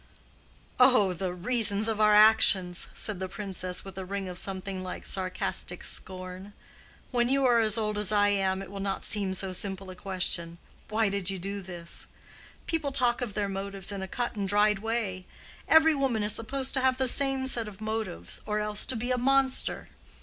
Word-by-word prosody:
"Oh—the 195 -8 +4
reasons 205 +2 +2
of 220 -1 -1
our 210 0 +5
actions!" 210 -4 +5
said 210 -4 -3
the 190 -1 -4
Princess, 185 -2 -4
with 195 0 -8
a - - -4
ring 195 +1 -4
of 180 0 -5
something 190 0 -3
like 185 0 -7
sarcastic 185 -1 -2
scorn. 185 +2 -4 0.6
"When 240 -1 +1
you 275 0 +3
are 240 -2 +4
as 220 -1 +3
old 210 -1 -1
as 210 -1 +4
I 205 -1 +3
am, 195 -1 0
it 190 - -11
will 200 - -7
not 195 0 -3
seem 195 -3 0
so 190 0 -3
simple 190 0 -2
a - - -10
question—'Why 185 +3 -1
did 195 -2 -1
you 195 - -2
do 200 +2 -4
this?' 175 -2 -4 0.6
People 305 -4 -2
talk 250 -2 +2
of 220 -6 -4
their 205 -1 -1
motives 195 0 -5
in 200 -1 -5
a 190 - -5
cut 240 +3 -3
and 200 -2 -3
dried 210 0 +3
way. 210 -4 -3 0.4
Every 320 0 +6
woman 265 -7 0
is 210 0 +2
supposed 260 +5 -3
to 265 - +1
have 260 0 +2
the 260 0 +1
same 270 0 +3
set 235 -4 0
of 205 -2 -10
motives, 215 - -4
or 210 0 -1
else 210 0 -2
to 260 - -2
be 245 +3 -3
a 250 - +1
monster. 270 +1 +1
205 Hz, 190 wpm, -28 LUFS, 190-230 Hz, 0.6 s, Every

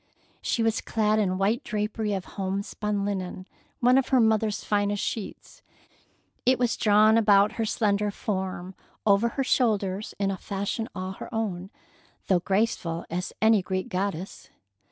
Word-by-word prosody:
She 230 - 0
was 225 0 +1
clad 215 -1 +1
in 185 -3 +1
white 205 +5 +1
drapery 210 0 -2
of 190 - -4
homespun 200 +1 -3
linen, 185 -2 -4 0.4
one 250 +2 +5
of 270 - -2
her 265 - +3
own 230 -3 +5
mother's 215 -2 0
finest 205 -1 0
sheets. 215 -4 -6 0.8
It 255 0 +4
was 245 -2 +1
drawn 215 +1 +5
about 205 -1 +5
her 225 - -2
slender 210 -1 +1
form, 190 -2 -4 0.3
over 210 +3 +4
her 270 - +2
shoulders, 210 -6 0
in 195 -1 0
a 190 - -3
fashion 200 +4 -3
all 185 0 -4
her 190 - -9
own, 195 -5 -3 0.6
though 185 -2 +4
graceful 180 -3 -1
as 180 +2 -3
any 220 -2 +5
Greek 185 +5 -3
goddess. 190 -2 -4
205 Hz, 155 wpm, -26 LUFS, 190-220 Hz, 0.8 s, one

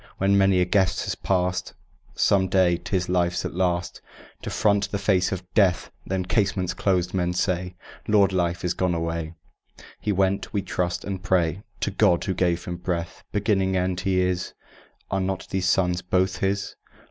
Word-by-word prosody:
When 95 +1 +2
many 95 -2 +4
a - - +3
guest 95 0 +1
has - - -2
passed, 90 -1 -1 0.4
Some 95 -1 +3
day 90 -2 +3
'tis 90 0 -2
Life's 90 -1 0
at - - -4
last 90 -1 -1 0.4
To - - -5
front 100 -1 +1
the 100 - -2
face 95 -2 +1
of 95 -1 -4
Death. 95 -5 +2 0.2
Then, 95 -1 -1
casements 95 -2 0
closed, 90 -1 0
men 90 -2 0
say: 90 0 -1 0.3
"Lord 100 -3 +4
Life 85 0 0
is 90 - +1
gone 90 -1 0
away; 85 0 -3 0.6
He 105 - -1
went, 95 0 0
we 100 -3 -1
trust 90 -2 -2
and 95 -2 -4
pray, 90 -1 +1 0.2
To - - 0
God, 95 -4 +3
who 95 - -1
gave 90 -1 0
him 90 0 -4
breath." 85 -2 -4
Beginning, 95 -2 +1
End, 90 0 0
He 95 0 +1
is: 90 -1 -1 0.6
Are 95 -1 0
not 95 0 -3
these 95 -1 0
sons 90 -2 +2
both 90 +1 0
His? 100 +1 -1
95 Hz, 175 wpm, -24 LUFS, 90-95 Hz, 0.6 s, many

